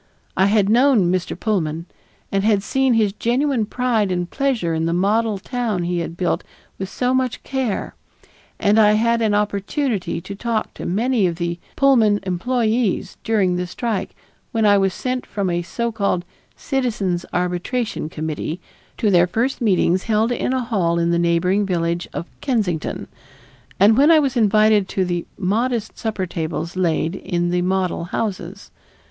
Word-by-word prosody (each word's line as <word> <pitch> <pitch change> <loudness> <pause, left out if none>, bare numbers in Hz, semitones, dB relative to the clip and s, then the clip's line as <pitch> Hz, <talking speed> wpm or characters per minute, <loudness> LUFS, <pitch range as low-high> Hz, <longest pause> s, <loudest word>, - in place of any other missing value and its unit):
I 190 - +4
had 205 -1 +3
known 230 -5 +4
Mr. 185 -1 -2
Pullman 170 -6 -1 0.5
and 195 0 +1
had 205 -2 +2
seen 265 +2 +2
his 210 -3 +2
genuine 245 0 0
pride 230 -5 0
and 175 -1 -1
pleasure 245 - -1
in 160 0 0
the 170 - 0
model 210 +3 +1
town 220 -3 -2
he 175 0 -1
had 170 0 -5
built 180 -1 0 0.4
with 190 -1 -4
so 250 +4 0
much 260 -2 -1
care; 260 -6 -2 0.7
and 210 +2 +3
I 210 -1 +6
had 230 +2 +2
an 215 -2 +2
opportunity 210 - -1
to 200 - -8
talk 225 +2 -2
to - - -6
many 220 +2 +1
of 170 - -2
the 170 0 -3 0.2
Pullman 230 -7 +4
employees 220 +3 0
during 195 -5 +1
the 180 0 -2
strike 220 +2 -3 0.4
when 225 -2 +1
I 205 -1 +6
was 195 -1 +2
sent 255 +6 -3
from 200 -3 -2
a 175 0 0
so 235 +7 -3
called 200 -5 -1 0.3
"Citizens' 210 -10 -1
Arbitration 180 +2 -2
Committee" 155 +1 -4 0.4
to 215 -4 +1
their 175 -1 +5
first 240 +9 -1
meetings 185 -4 +2
held 220 +1 +1
in 245 - -1
a 260 -1 0
hall 185 -8 0
in 170 0 +1
the 170 - +2
neighboring 170 +4 +2
village 170 -2 -1
of - - -5 0.2
Kensington, 205 - -1 0.7
and 205 +3 +6
when 285 +5 +5
I 330 - +7
was 275 -4 +1
invited 215 -2 +4
to 190 - 0
the 175 -1 -3
modest 225 +4 -1
supper 215 -5 -2
tables 165 0 -4
laid 165 -2 0
in 175 -2 -1
the 180 0 +1
model 185 -2 -1
houses. 190 0 -4
205 Hz, 165 wpm, -21 LUFS, 180-230 Hz, 0.7 s, I